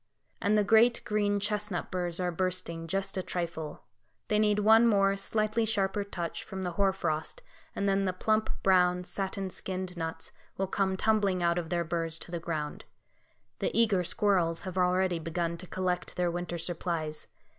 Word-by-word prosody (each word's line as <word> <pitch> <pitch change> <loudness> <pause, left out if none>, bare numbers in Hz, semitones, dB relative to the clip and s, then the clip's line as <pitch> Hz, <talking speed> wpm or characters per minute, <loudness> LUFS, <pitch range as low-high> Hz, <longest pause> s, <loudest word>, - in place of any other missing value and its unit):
And 210 +1 +3
the 210 - +4
great 230 +3 +4
green 205 -1 +1
chestnut 210 -2 -2
burs 175 -1 -1
are 180 -1 0
bursting, 170 -2 -2
just 195 +3 -2
a - - +1
trifle; 165 -4 -4 0.5
they 210 - +3
need 210 -1 +3
one 220 +3 +6
more, 195 -2 +4
slightly 215 +3 0
sharper 205 -2 +1
touch 175 -4 -5
from 190 -2 -6
the 180 - -2
hoar 195 +3 +2
frost, 190 - -3 0.3
and 200 - 0
then 195 0 +2
the 185 - +1
plump, 215 +4 +1
brown, 180 -1 +4
satin 190 +1 -3
skinned 185 -1 -4
nuts 160 -1 -5 0.3
will 195 - 0
come 190 0 0
tumbling 200 -4 +2
out 170 0 +2
of 165 -2 -5
their 170 0 0
burs 165 0 -2
to 170 - -10
the 170 - -2
ground. 155 -3 -4 0.8
The - - +1
eager 205 -6 +4
squirrels 175 -3 +1
have 185 -1 -6
already 180 -1 +2
begun 165 +1 -2
to 185 - -8
collect 180 -1 -2
their 175 -1 +1
winter 175 0 -3
supplies. 165 -2 -3
185 Hz, 175 wpm, -30 LUFS, 170-200 Hz, 0.8 s, one